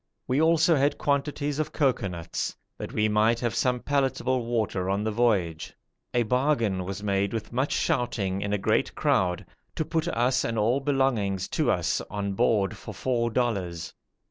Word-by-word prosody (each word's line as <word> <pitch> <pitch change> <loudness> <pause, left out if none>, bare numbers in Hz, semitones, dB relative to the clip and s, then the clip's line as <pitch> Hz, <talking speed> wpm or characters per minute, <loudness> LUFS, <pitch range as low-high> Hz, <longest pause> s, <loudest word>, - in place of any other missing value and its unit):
We 130 +4 +2
also 165 +1 +4
had 140 +2 +2
quantities 145 0 -1
of 155 - -1
cocoanuts, 100 - -1 0.2
that - - -5
we 105 0 +1
might 110 +2 +3
have 120 -2 0
some 125 -1 +1
palatable 130 -3 0
water 105 -6 -1
on 100 +2 0
the 110 - -1
voyage. 100 -8 0 0.4
A 120 - +2
bargain 115 -6 +1
was 100 +2 -5
made 100 0 0
with 110 0 -4
much 130 +4 0
shouting 100 -6 0
in 100 - -2
a 105 - +2
great 95 - 0
crowd, 90 -1 +1 0.3
to 155 - -1
put 165 +1 -1
us 125 -3 +1
and 115 -1 -2
all 115 +5 +2
belonging 135 -8 +1
to 95 - -1
us - - +1
on 100 -1 -3
board 105 -2 +2
for - - -9
four 120 -2 0
dollars. 100 -9 -2
115 Hz, 170 wpm, -26 LUFS, 100-135 Hz, 0.4 s, also